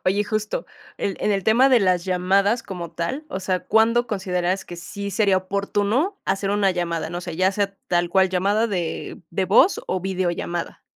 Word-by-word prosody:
Oye, 200 +3 +2
justo, 215 - -2 0.3
el 195 - -2
en 210 - +1
el 195 -1 0
tema 245 +5 +5
de 250 -4 +5
las 180 -2 +2
llamadas 195 +5 +2
como 175 -3 -7
tal, 255 - -3
o 190 - -4
sea, 185 -1 -1
¿cuándo 230 +2 +3
consideras 185 -2 -1
que 175 - -9
sí 200 +4 -6
sería 195 -1 +3
oportuno 205 - 0
hacer 195 +1 -1
una 200 -1 +2
llamada? 170 -2 -2
No 175 +1 -4
sé, 175 -2 -6
ya 185 +1 +3
sea 200 0 -1
tal 175 0 +1
cual 190 0 +3
llamada 200 +5 +1
de 180 -7 -4
de 190 +3 0
voz 220 - +4
o 185 - -1
videollamada. 175 -2 -3
190 Hz, 185 wpm, -23 LUFS, 180-210 Hz, 0.3 s, tema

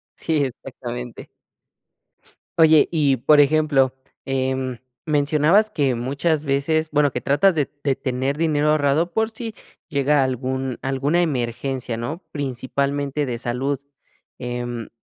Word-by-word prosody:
Sí, 155 -3 0
exactamente. 125 -1 -7 1.3
Oye 160 -2 +6
y, 145 -5 +3
por 145 +5 +5
ejemplo, 145 -3 +3 0.3
em, 130 -2 -1 0.3
mencionabas 155 +8 +3
que 135 - +1
muchas 145 +5 -1
veces 155 +3 +1
bueno, 145 -1 +3
que 125 - -3
tratas 145 +10 +3
de 145 -3 +1
de 140 -2 +1
tener 135 +1 -2
dinero 150 -2 +2
ahorrado 155 +3 +2
por 220 0 +1
si 225 0 -6 0.3
llega 145 -2 +2
algún 130 0 -2
alguna 140 +6 0
emergencia, 125 -4 -2
¿no?, 145 +10 -5
principalmente 140 +1 -2
de 120 -2 -3
salud. 130 +3 -2 0.6
Em, 120 -1 -4
140 Hz, 120 wpm, -22 LUFS, 130-155 Hz, 1.3 s, Oye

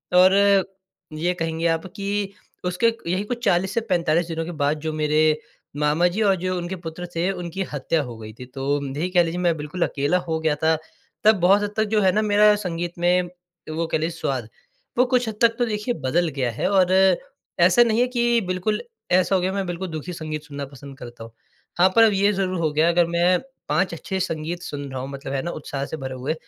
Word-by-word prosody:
और 185 +1 +7 0.8
ये 175 +3 0
कहेंगे 165 -1 -1
आप 165 +1 0
कि 200 0 -2 0.3
उसके 180 +6 +2
क 230 - -12
यहीं 185 +3 0
कुछ 240 +2 -5
40 185 +2 +2
से 230 - +1
45 170 -2 +2
दिनों 165 -1 -3
के 175 - -5
बाद 145 +2 +1
जो 160 +1 -3
मेरे 150 0 0 0.6
मामा 150 +4 +3
जी 215 - -1
और 200 -2 +4
जो 185 0 -2
उनके 175 +2 -4
पुत्र 165 +2 -6
थे 170 +3 +1
उनकी 180 0 -4
हत्या 150 +3 0
हो 120 -3 -8
गई 110 -1 -9
थी। 125 - -7
तो 135 +2 -7 0.3
यही 175 +4 -1
कह 180 -1 +5
लीजिए 170 +1 -3
मैं 175 -2 +2
बिल्कुल 150 +4 -6
अकेला 145 +5 0
हो 160 -1 -1
गया 160 -2 +1
था। 160 0 +4 0.5
तब 220 +1 +6
बहुत 195 +4 +5
हद 205 0 -3
तक 220 - +3
जो 215 - +4
है 190 -2 +4
ना 215 - +1
मेरा 210 0 +5
संगीत 175 -4 -4
में 175 +1 +2 0.5
वो 165 +1 0
कह - - 0
लें 160 +1 -1
स्वाद, 135 -8 -3 0.5
वो 250 - +5
कुछ 250 -1 +1
हद 220 - -6
तक 230 -1 +5
तो 240 - +3
देखिए 215 +2 -2
बदल 165 +7 +2
गया 125 -3 0
है। 115 - -1
और 185 -2 +4 0.7
ऐसा 180 +7 +6
नहीं 230 0 +2
है 250 - +3
कि 240 -1 +2
बिल्कुल 185 +4 -1 0.3
ऐसा 185 +2 +3
हो 185 - +2
गया 185 +1 -1
मैं 195 -1 -1
बिल्कुल 175 +2 -4
दुखी 160 +3 -5
संगीत 155 -2 -5
सुनना 145 -2 -6
पसंद 140 0 -12
करता 120 -2 -9
हूँ। 115 - -11 0.5
हाँ, 185 +2 +6
पर 230 - +7
अब 220 -2 +5
ये 200 +1 +3
ज़रूर 185 -2 -1
हो 155 -2 +1
गया 155 +2 +3
है 170 - +3
अगर 175 0 +4
मैं 175 +1 +3 0.3
5 185 -2 +1
अच्छे 190 +3 -4
संगीत 170 -1 -3
सुन 145 -1 -6
रहा 130 - -4
हूँ 135 - -6
मतलब 140 0 -6
है 135 - 0
ना, 170 - -4
उत्साह 140 -3 -5
से 160 - -6
भरे 130 -2 -5
हुए 130 +5 -2
175 Hz, 230 wpm, -23 LUFS, 155-195 Hz, 0.8 s, और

